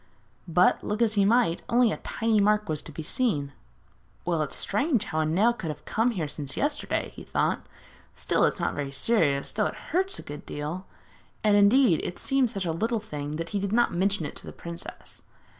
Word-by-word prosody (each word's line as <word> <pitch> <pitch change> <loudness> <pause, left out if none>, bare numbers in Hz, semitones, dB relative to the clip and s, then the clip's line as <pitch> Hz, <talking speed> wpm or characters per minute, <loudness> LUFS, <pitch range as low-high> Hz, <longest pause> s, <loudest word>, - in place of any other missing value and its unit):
But, 175 +2 +3
look 210 +1 -2
as 230 -2 +3
he 200 -2 +3
might, 225 -5 +3
only 240 -1 +4
a - - -2
tiny 225 -2 0
mark 210 +1 +3
was 155 -1 -1
to - - -11
be 160 +1 -6
seen. 150 - 0 0.7
'Well, 170 -3 +1
it's 150 - -3
strange 225 +1 +1
how 155 - -2
a 155 - +2
nail 200 +9 +3
could 180 -8 -5
have 150 - -7
come 225 +3 +1
here 180 -10 -2
since 140 -1 -1
yesterday,' 290 +1 -1
he - - -9
thought. - - -1 0.5
'Still, - - +1
it - - +1
is - - -16
not - - 0
very 140 -1 -3
serious, 140 - +1
though - - +1
it - - -6 0.2
hurts 380 +3 +1
a - - -8
good 145 0 -8
deal.' 155 +6 -5 0.6
And, 210 -1 +4
indeed, 205 - +5
it 175 - -4
seemed 270 -3 +1
such 195 -5 -4
a 165 - 0
little 225 +8 0
thing 150 -8 -5
that 165 +1 -4
he 205 - -1
did 200 0 -2
not 240 +2 +3
mention 190 -1 +1
it - - -6
to - - -10
the - - -6
princess. 170 0 -9
200 Hz, 215 wpm, -27 LUFS, 155-230 Hz, 0.7 s, indeed